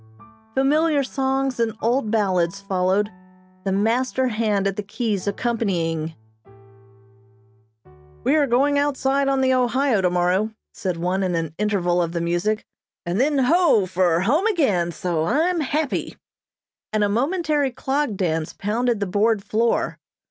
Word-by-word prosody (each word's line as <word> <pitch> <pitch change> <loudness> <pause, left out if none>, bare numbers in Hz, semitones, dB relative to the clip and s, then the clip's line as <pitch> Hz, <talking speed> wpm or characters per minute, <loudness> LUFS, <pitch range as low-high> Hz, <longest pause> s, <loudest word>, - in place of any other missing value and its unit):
Familiar 295 +2 +2
songs 270 -1 -1
and 225 -2 0
old 235 0 0
ballads 190 -4 +1
followed, 195 +2 0 0.5
the 195 - 0
master 250 +6 +1
hand 215 -3 0
at 195 -1 0
the 210 - -3
keys 205 -2 -3
accompanying. 175 -8 -1 2.1
"We 295 - +3
are 295 -2 +3
going 280 +4 +2
outside 275 -1 +1
on 270 -1 +1
the 260 0 +3
Ohio 255 -2 +2
tomorrow," 180 +3 +1 0.2
said 185 -6 -3
one 180 +3 -1
in 185 -2 0
an 165 -2 -2
interval 180 -4 +1
of 170 -1 -2
the 170 - -1
music, 175 +6 -1 0.4
"and 175 +6 0
then, 290 +1 +2
ho! 280 - +4
for 175 -2 +1
home 295 - +2
again, 210 - +1
so 165 -1 -2
I'm 335 - +1
happy," 300 0 -2 0.7
and 215 -1 +1
a - - +3
momentary 290 - 0
clog 265 -2 -2
dance 160 -4 -1
pounded 230 +2 -1
the - - +1
board 205 +2 +1
floor. 225 +3 0
215 Hz, 140 wpm, -22 LUFS, 185-270 Hz, 2.1 s, ho